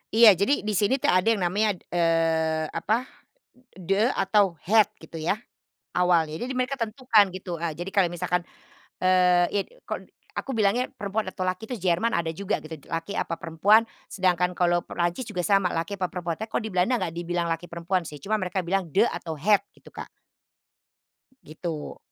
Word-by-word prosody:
Iya, 230 -1 +9
jadi 270 +9 +2
di 215 - -1
sini 210 +5 +2
tuh - - +4
ada 185 +3 +2
yang 220 -4 +3
namanya, 205 +4 +1
d 175 - -20
eee, 165 -2 +2
apa, 225 +4 0 0.5
e 250 - -25 0.2
"de", 185 +1 0 0.2
atau 195 -6 +2
"het", 215 +1 +5
gitu 160 - -16
ya. 165 +6 -1 0.6
Awalnya, 170 -3 +2
jadi 245 +10 -4
mereka 255 +2 -1
tentukan 230 -2 +3
gitu, 180 -2 -5
eee, 165 0 -3
jadi 175 +5 -6
kalau 195 -2 +2
misalkan, 175 0 -1 0.5
eee, 180 -1 +4
yit 200 -1 0 0.2
kon - - -6 0.2
aku 270 -3 -4
bilangnya 220 +4 +2
perempuan 205 0 -2
atau 190 - -5
laki 185 +4 -2
itu 250 - -3
Jerman 185 +4 +1
ada 165 -1 -1
juga 195 -1 -2
gitu, 155 -1 -8
laki 165 +4 -3
apa 165 - -2
perempuan, 195 +8 +3 0.2
sedangkan 180 -1 +1
kalau 175 -1 +2
Perancis 175 +8 -2
juga 180 -1 -3
sama, 195 +1 +3
laki 170 +4 -3
apa 185 - 0
perempuan. 170 -2 -4
Teko 220 0 -4
di 220 - -5
Belanda 185 +8 +2
nggak 185 -7 -2
dibilang 175 +1 -2
laki 165 +2 -5
perempuan 170 +1 -2
sih, 150 - -8
cuma 210 +8 -2
mereka 185 0 -2
bilang 185 0 -1
"de", 200 +9 +3
atau 160 -8 -4
"het", 205 +7 +3 0.2
gitu, - - -17
Kak. - - -8 1.4
Gitu. 155 -1 -6
185 Hz, 180 wpm, -26 LUFS, 170-210 Hz, 1.4 s, Iya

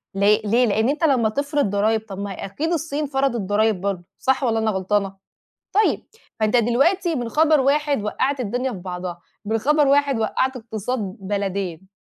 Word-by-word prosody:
ل - - -3 0.3
ليه؟ 235 +4 +3
لأن 220 +3 +1
أنت 295 +3 -2
لمّا 250 -8 +3
تفرض 285 +3 0
ضرايب 215 +2 +1
طَب 195 - -6
ما 200 0 -4
أكيد 315 - -2
الصين 305 -2 -2
فرضت 270 -4 0
ضرايب 205 0 +1
برضه 195 -3 -2 0.2
صح 265 +1 +1
والّا 225 -2 +1
أنا 220 -1 +1
غلطانة؟ 195 0 -1 0.6
طيب 425 +2 +2 0.3
فأنت 215 +3 +2
دلوقتي 300 - +2
من 240 -5 -2
خبر 310 +1 +3
واحد 285 -2 +1
وقعت 260 +6 -1
الدنيا 245 +3 -2
في 195 - -6
بعضها 180 -1 -6 0.2
من 220 +2 0
خبر 295 +5 +3
واحد 280 -2 +3
وقعت 260 +4 0
اقتصاد 225 +1 -4 0.2
بلدين. 195 -3 -3
230 Hz, 170 wpm, -22 LUFS, 200-280 Hz, 0.6 s, ليه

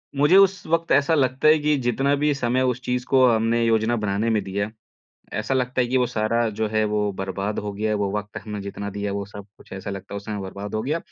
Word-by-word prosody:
मुझे 145 +6 +4
उस 195 -1 +4
वक़्त 165 +1 0
ऐसा 140 +3 +4
लगता 130 0 +2
है 155 - +7
कि 150 0 +2
जितना 135 +4 +1
भी 150 +1 +1
समय 125 0 0
उस 125 - -7
चीज़ 125 0 -2
को 130 -1 +5
हमने 115 +1 +2
योजना 115 +1 +2
बनाने 105 0 -1
में 110 -2 +2
दिया, 100 +2 -2 0.6
ऐसा 110 +5 -1
लगता 125 0 0
है 125 - +2
कि 130 +2 0
वो 125 - +3
सारा 115 +1 0
जो 110 +1 -2
है, 110 0 +1
वो 105 -1 0
बर्बाद 95 +2 -3
हो 105 0 -3
गया 105 +2 -2
है। - - +1
वो 100 -1 -1
वक़्त 105 0 -7
हमने 105 -2 -6
जितना 100 +1 -5
दिया 100 0 -3
है, - - -3
वो 100 - -3
सब 100 0 -10
कुछ, - - -17
ऐसा 95 +1 -6
लगता 100 0 -7
है, - - -3
वो - - -4
समय 105 -2 -4
बर्बाद 100 +2 -7
हो 110 - -1
गया। 150 +7 -1
110 Hz, 260 wpm, -23 LUFS, 100-130 Hz, 0.6 s, है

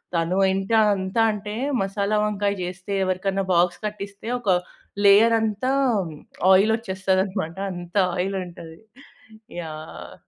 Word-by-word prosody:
తను 170 +3 0 0.2
ఎంతా 195 +4 +1 0.2
అంతా 190 +4 -1
అంటే 210 0 -6 0.3
మసాలా 200 +2 -1
వంకాయ 205 -1 0
చేస్తే 185 +2 -6
ఎవరికైనా 190 +1 -1
బాక్స్ 175 +1 +2
కట్టిస్తే 200 0 -6
ఒక 210 -5 -3 0.6
లేయరంతా 220 +3 +4 0.8
ఆయిల్ 195 +4 +5
వచ్చేస్తదన్నమాట. 190 -3 -1
అంత 175 0 -9 0.2
ఆయిలుంటది. 180 -3 -4 0.8
యాహ్! 155 -1 -9
195 Hz, 100 wpm, -23 LUFS, 180-210 Hz, 0.8 s, ఆయిల్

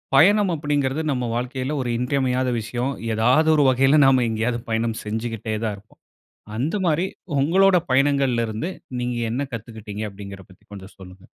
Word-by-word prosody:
பயணம் 200 +5 +5
அப்படிங்கிறது 145 -1 -1
நம்ம 125 -2 -1
வாழ்க்கையில 130 +4 -3
ஒரு 125 - -3
இன்றியமையாத 130 0 0
விஷயம். 120 +4 -3 0.2
ஏதாவது 125 +8 +3
ஒரு 150 - +4
வகையில 135 +3 +4
நாம 130 -2 +4
எங்கேயாவது 115 +2 -1
பயணம் 115 0 -1
செஞ்சுகிட்டே 110 0 -4
தான் 105 -2 -2
இருப்போம். 105 +2 -21 0.6
அந்த 145 - -1
மாரி 170 +3 +1 0.3
ஒங்களோட 185 +6 +4
பயணங்கள்ல 135 -3 +2
இருந்து 110 +11 -4 0.3
நீங்க 125 0 -2
என்ன 125 +5 -1
கத்துக்கிட்டீங்க 110 -2 -7
அப்படிங்கிறத 100 -1 -10
பத்தி 95 - -20
கொஞ்சம் 95 -1 -11
சொல்லுங்க? 95 0 -13
125 Hz, 150 wpm, -22 LUFS, 110-140 Hz, 0.6 s, பயணம்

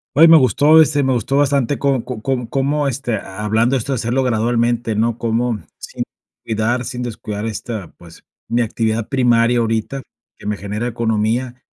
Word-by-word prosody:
Oye 160 +4 +8
me 165 - +8
gustó, 150 +3 +5
este, 145 -2 +2
me 130 -1 +2
gustó 125 +3 0
bastante 140 -2 +1
co 135 -4 +1
co 125 -3 -6
com 130 0 -1
cómo, 140 +3 0
este, 125 -3 -2
hablando 110 +6 0
esto 135 +3 -3
de - - 0
hacerlo 120 +3 0
gradualmente, 120 0 0
¿no? 115 +2 0
Cómo 115 -1 -1 0.2
sin - - -5 0.4
cuidar 115 +3 -1
sin 125 0 -5
descuidar 110 -3 -5
esta, 110 -3 -5
pues, 85 -1 -16 0.2
mi 120 - +1
actividad 110 -1 -1
primaria 120 -2 +3
ahorita 115 +4 -1 0.4
que - - -14
me 105 0 -2
genera 105 +4 -4
economía 115 +2 -1
120 Hz, 170 wpm, -18 LUFS, 110-130 Hz, 0.4 s, Oye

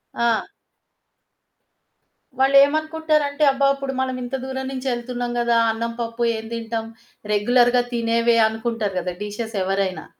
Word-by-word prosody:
ఆ! 235 -2 +1 1.9
వాళ్ళేమనుకుంటారంటే 300 +2 +3
అబ్బా! 275 +1 +2
ఇప్పుడు 275 -1 -4
మనం 260 -1 -2
ఇంత 250 +2 -4
దూరం 265 0 -4
నుంచి 265 0 -5
ఎళ్తున్నాం 240 0 -4
కదా! 235 -1 +2
అన్నం 230 +1 -3
పప్పు 230 +1 -2
ఏం 220 - -7
తింటాం. 225 -1 -4 0.5
రెగ్యులర్‌గా 245 +3 +3
తినేవే 230 0 +2
అనుకుంటారు 220 -3 -3
కదా! 180 0 -4
డిషెస్ 220 +2 -5
ఎవరైనా. 195 0 -1
235 Hz, 120 wpm, -22 LUFS, 225-265 Hz, 1.9 s, వాళ్ళేమనుకుంటారంటే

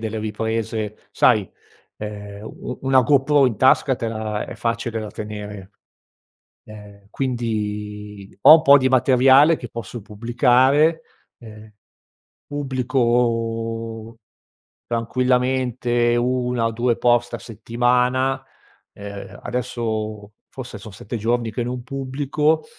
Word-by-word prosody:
delle 110 0 -4
riprese, 110 0 -3 0.2
sai, 110 -6 +3 0.5
ehm, 105 -1 -8
u 110 - -8
u - - -6
una 135 -1 +4
GoPro 140 +2 +3
in 115 -5 -1
tasca 130 +1 +4
te 115 -1 -4
la 110 -1 -3
è - - -9
facile 115 0 -2
da 110 -1 -5
tenere, 105 -2 -8 0.9
ehm, 100 -1 -14
quindi, 105 -5 -4
ho 155 - +10
un 160 - +2
po' 140 -1 +7
di 130 -1 +1
materiale 130 +4 +5
che 120 - -8
posso 115 0 -7
pubblicare, 130 +9 +2 0.4
ehm, 110 -2 -13 0.8
pubblico 115 -4 -1 0.7
tranquillamente 125 0 0
1 125 -1 0
o 115 - 0
2 120 +1 0
post 120 0 +2
a - - -4
settimana, 125 +4 0 0.5
uhm, 100 0 -9
adesso 110 -4 -4 0.2
forse 120 -5 -8
son 105 0 -11
7 105 +5 -7
giorni 115 +1 -1
che 120 +2 -3
non 125 0 -4
pubblico 135 +4 -1
120 Hz, 115 wpm, -21 LUFS, 110-130 Hz, 0.9 s, ho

